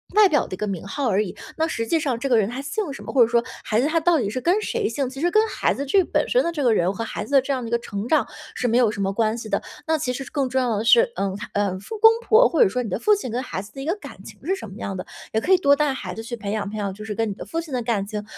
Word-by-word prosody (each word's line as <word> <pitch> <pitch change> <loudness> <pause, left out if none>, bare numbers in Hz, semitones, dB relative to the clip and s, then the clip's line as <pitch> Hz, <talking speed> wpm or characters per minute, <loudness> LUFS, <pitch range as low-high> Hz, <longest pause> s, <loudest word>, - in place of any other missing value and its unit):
外 420 -2 +7
表 295 -5 +2
的 - - -9
一 - - -4
个 210 - -2
名 195 -1 -4
号 270 +5 -1
而 200 0 +2
已， 205 - -4 0.2
那 320 0 +1
实 230 -8 -2
际 325 +8 +1
上 275 -6 -1
这 275 +3 -3
个 240 - +5
人 210 -2 +2
他 250 +3 -5
姓 290 +3 -3
什 - - -9
么， - - -6
或 270 - 0
者 230 - +7
说 235 0 +2 0.2
孩 220 +2 +2
子 280 - +2
他 330 +2 +2
到 335 +1 +3
底 210 -5 -1
是 230 - -3
跟 360 +10 +2
谁 440 0 -1
姓， 275 -8 -2
其 270 +1 -9
实 345 +4 +2
跟 430 +4 +4
孩 - - 0
子 280 - -4
这 380 +8 +4
本 - - 0
身 - - +4
的 - - +1
这 295 -3 -2
个 240 -3 +4
人， 180 -2 +1
和 215 - -4
孩 - - -5
子 285 - -9
的 275 - +7
这 270 - -4
样 260 -2 -1
的 235 - -5
一 - - -8
个 235 - +3
成 205 -1 -5
长 290 -4 +3 0.3
是 245 - 0
没 230 - +3
有 245 -3 +4
什 210 -1 -4
么 195 0 0
关 220 +2 0
系 225 -2 -7
的。 - - 0 0.2
那 320 0 +1
其 255 -4 -2
实 270 - -4
更 280 -3 0
重 260 +1 0
要 240 -4 0
的 215 - -2
是， 475 - +5
嗯， 195 -1 -1 0.2
呃， 200 -2 0
父 435 - -8
公 445 +1 +9 0.2
婆 470 +3 +6
或 330 - +4
者 - - +3
说 250 +6 -1
你 225 - -5
的 - - -1
父 420 - +4
亲 390 -11 -5
跟 245 +3 -2
孩 185 - -4
子 200 +2 -14
的 270 - -7
一 - - -5
个 335 +5 0
感 415 - -11
情 - - -12
是 380 - +1
什 380 - -8
么 195 - -11
样 195 -4 -4
的。 185 - -5 0.3
也 220 - +1
可 365 - -1
以 375 - +8
多 285 -5 +4
带 295 -1 +1
孩 185 -8 -6
子 225 - -6
去 240 +1 -6
培 205 -2 -4
养 210 -1 -2
培 215 - -6
养， 200 -2 -2
就 210 +2 -10
是 215 -1 -4
跟 225 +1 -1
你 - - -3
的 195 - -8
父 330 - -3
亲 325 -4 -7
的 250 - 0
感 220 -4 -1
情。 210 0 -4
250 Hz, 385 characters per minute, -23 LUFS, 215-310 Hz, 0.3 s, 公